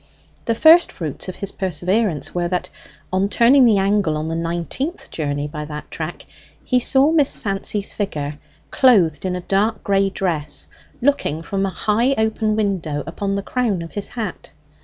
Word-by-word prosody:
The 230 - +1
first 325 +7 +6
fruits 160 +2 -4
of 185 - -6
his 200 - -4
perseverance 185 - -1
were 175 -1 0
that, 180 0 -2 0.4
on 190 +2 +1
turning 250 +5 +5
the 220 -4 +5
angle 195 -5 +1
on 155 +1 -3
the 165 - -2
nineteenth 170 - -3
journey 145 -2 -2
by 150 0 -6
that 150 0 -8
track, 160 +1 -6 0.4
he 250 - +2
saw 270 +4 +4
Miss 300 -4 +3
Fancy's 200 0 -2
figure, 150 -7 -3 0.3
clothed 190 - +4
in 180 -1 -1
a 180 - -4
dark 200 +5 0
gray 195 0 +2
dress, 160 -6 -2 0.4
looking 245 - +1
from 195 +2 -1
a - - -1
high 230 +7 +1
open 220 -1 +1
window 180 -9 -1
upon 195 +4 -3
the 200 - -2
crown 220 -9 -1
of 165 - -9
his 205 - -2
hat. 225 -3 -6
195 Hz, 170 wpm, -20 LUFS, 165-220 Hz, 0.4 s, first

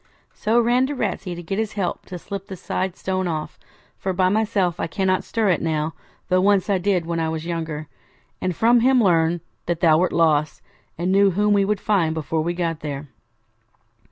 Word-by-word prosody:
So 225 +2 +1
ran 245 +2 +3
to 290 - -4
Ratsey 185 -8 -3
to 175 - -8
get 195 +5 -3
his 220 -1 -2
help 195 -4 -3
to 180 - -6
slip 195 +2 -7
the 190 - -6
side 185 +1 -3
stone 185 -1 -2
off, 155 -2 -4 0.4
for 190 - -2
by 185 0 +2
myself 200 -4 +1
I - - -1
cannot 185 +2 0
stir 225 -3 0
it 175 - +2
now, 155 -1 -1 0.3
though 185 0 +3
once 200 0 +3
I 190 - +2
did 180 -2 +1
when 170 0 -2
I 160 -1 0
was 160 0 -4
younger; 160 -3 -4 0.5
and 185 -2 -1
from 235 +5 +4
him 255 +2 +4
learned 170 -5 +3 0.3
that 170 -1 -1
thou 160 -2 +5
wert 180 0 +1
lost, 155 -2 +1 0.3
and 175 +3 -1
knew 200 +1 +5
whom 205 +3 +2
we 200 -1 +3
should 210 -1 0
find 175 -7 +1
before 160 0 -1
we 170 +2 -2
got 165 -3 -2
there.' 145 -1 -6
185 Hz, 205 wpm, -22 LUFS, 165-200 Hz, 0.5 s, thou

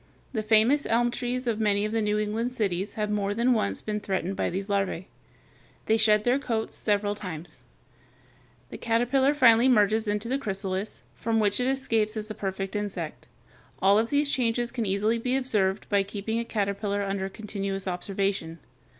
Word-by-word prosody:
The 220 - 0
famous 220 +7 +3
elm 240 +1 +2
trees 250 +1 -3
of 230 -3 -1
many 205 -1 +2
of 215 - -3
the 225 0 0
New 210 0 +1
England 215 +3 -1
cities 200 -5 -2
have 210 -1 -1
more 205 -1 -1
than 240 +3 +3
once 100 - -1
been 210 -1 -2
threatened 195 -2 -2
by - - 0
these 195 +2 -4
larvæ. 195 -3 -1 0.8
They 220 - +3
shed 215 -1 +4
their 245 +4 +2
coats 225 -5 -2
several 205 -1 +1
times. 180 -5 -7 1.1
The - - -7
caterpillar 250 +5 +2
finally 245 -2 +6
merges 220 -1 +3
into 210 +2 -1
the 265 +3 0
chrysalis, 195 -2 -4
from 225 0 -1
which 205 0 +2
it 250 - +1
escapes 225 -5 0
as 215 0 -5
the - - -4
perfect 195 0 -4
insect. 195 -6 -4 0.5
All 200 +2 +5
of 225 +1 0
these 285 0 +2
changes 240 -2 0
can 235 -4 -2
easily 210 +4 +1
be 250 +2 0
observed 210 -7 0
by 200 -1 +3
keeping 205 +3 -3
a 235 - -3
caterpillar 200 -1 -1
under 195 -1 -2
continuous 195 -2 -4
observation. 185 -2 -2
210 Hz, 175 wpm, -27 LUFS, 200-230 Hz, 1.1 s, finally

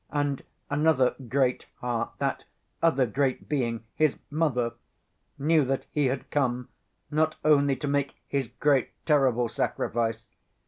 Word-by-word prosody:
and 145 -2 -1 0.3
another 145 -3 +3 0.2
great 130 0 +1
heart, 120 -1 -2
that - - -1 0.4
other 150 -6 +4
great 130 +3 -1
being, 115 -6 -1
His 155 -3 +2
Mother, 130 -7 +1 0.6
knew 155 +2 +3
that 135 0 -1
He 145 -2 +2
had 130 +1 -3
come 125 -3 0 0.4
not 155 +1 +2
only 140 -2 +5
to 130 +3 -4
make 140 0 0
His 140 -3 -1
great 140 +1 +2 0.2
terrible 130 -6 +3
sacrifice. 115 0 -2
135 Hz, 130 wpm, -27 LUFS, 125-145 Hz, 0.6 s, only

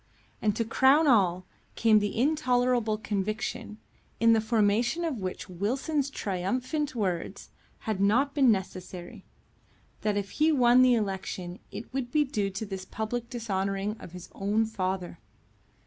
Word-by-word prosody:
And 210 -2 +1
to 230 - -1
crown 265 +7 +4
all, 185 - +3 0.3
came 220 -2 +5
the 205 0 -2
intolerable 250 -6 +2
conviction, 215 +1 -3 0.4
in 230 0 +5
the 220 - +3
formation 225 +8 +1
of 290 -8 -2
which 185 0 -5
Wilson's 260 - -1
triumphant 250 - -2
words 185 -6 -3 0.3
had 215 -3 -2
not 250 +8 +3
been 270 -5 +5
necessary, 185 -3 -5 0.8
that 210 -1 0
if 200 -1 -3
he 310 +1 +3
won 250 -3 +5
the 255 -1 +6
election 190 -4 -3
it 230 - -9
would 260 -2 -3
be 305 -1 +3
due 210 -8 -1
to 195 +3 -5
this 195 -2 -6
public 220 +4 -4
dishonouring 200 -3 -2
of 170 - -11
his 180 -1 -9
own 210 +3 +1
father. 185 -5 -3
220 Hz, 145 wpm, -28 LUFS, 195-250 Hz, 0.8 s, the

